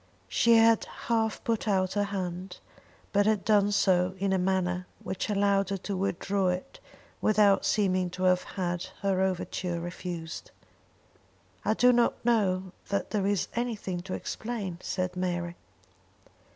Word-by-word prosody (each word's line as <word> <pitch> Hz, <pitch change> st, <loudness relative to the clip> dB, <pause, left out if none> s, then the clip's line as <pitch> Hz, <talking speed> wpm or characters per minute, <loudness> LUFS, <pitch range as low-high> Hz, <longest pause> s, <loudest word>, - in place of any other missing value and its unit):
She 235 Hz, -1 st, +4 dB
had 225 Hz, 0 st, +5 dB
half 225 Hz, -2 st, -2 dB
put 225 Hz, -1 st, -1 dB
out 190 Hz, -2 st, +1 dB
her 205 Hz, 0 st, +1 dB
hand, 185 Hz, -2 st, -4 dB, 0.6 s
but 205 Hz, 0 st, +3 dB
had 215 Hz, -3 st, +1 dB
done 205 Hz, -1 st, +4 dB
so 185 Hz, -2 st, +2 dB
in 195 Hz, 0 st, 0 dB
a 190 Hz, -, +2 dB
manner 180 Hz, -1 st, 0 dB, 0.2 s
which 190 Hz, -, -3 dB
allowed 200 Hz, -1 st, +2 dB
her 200 Hz, -, -1 dB
to 195 Hz, +2 st, -4 dB
withdraw 195 Hz, +1 st, 0 dB
it 180 Hz, -, -3 dB, 0.4 s
without 210 Hz, -2 st, +4 dB
seeming 185 Hz, -3 st, +2 dB
to 185 Hz, -, -3 dB
have 180 Hz, 0 st, +4 dB
had 175 Hz, -2 st, -3 dB, 0.2 s
her 195 Hz, -1 st, +2 dB
overture 180 Hz, -2 st, -1 dB
refused. 175 Hz, -1 st, -6 dB, 1.1 s
"I 215 Hz, -, +1 dB
do 250 Hz, +2 st, +5 dB
not 240 Hz, -1 st, +1 dB
know 190 Hz, -6 st, +1 dB, 0.2 s
that 200 Hz, -, -1 dB
there 200 Hz, -2 st, 0 dB
is 200 Hz, -2 st, +1 dB
anything 220 Hz, -7 st, -2 dB
to 185 Hz, +1 st, -5 dB
explain," 210 Hz, -7 st, -4 dB
said 185 Hz, -1 st, -2 dB
Mary. 175 Hz, -1 st, -2 dB
190 Hz, 145 wpm, -28 LUFS, 180-210 Hz, 1.1 s, had